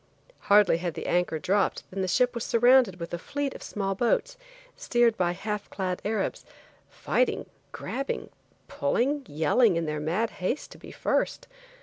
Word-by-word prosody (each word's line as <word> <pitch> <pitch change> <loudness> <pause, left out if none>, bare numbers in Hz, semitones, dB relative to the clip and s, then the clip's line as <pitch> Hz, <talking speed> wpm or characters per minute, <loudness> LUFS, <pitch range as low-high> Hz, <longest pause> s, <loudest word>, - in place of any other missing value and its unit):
Hardly 205 -4 +6
had 170 -1 -4
the - - -5
anchor 175 -2 +1
dropped 190 +5 0
than 195 +1 -3
the 185 - 0
ship 245 +7 +2
was 235 -1 -3
surrounded 240 -5 +4
with 170 0 -6
a 175 - -2
fleet 285 +7 -3
of - - -10
small 195 -1 -2
boats, 245 - 0 0.4
steered 240 - +2
by 175 -3 +1
half 210 +2 -4
clad 185 -2 -3
Arabs, 210 -1 -2 0.5
fighting, 470 -3 0 0.3
grabbing, 275 - -4 0.4
pulling, 280 +4 0
yelling 165 - +3
in 165 0 0
their 150 -1 -2
mad 180 +10 -1
haste 185 +11 -3
to - - -13
be - - -11
first. - - -1
205 Hz, 160 wpm, -27 LUFS, 180-245 Hz, 0.5 s, Hardly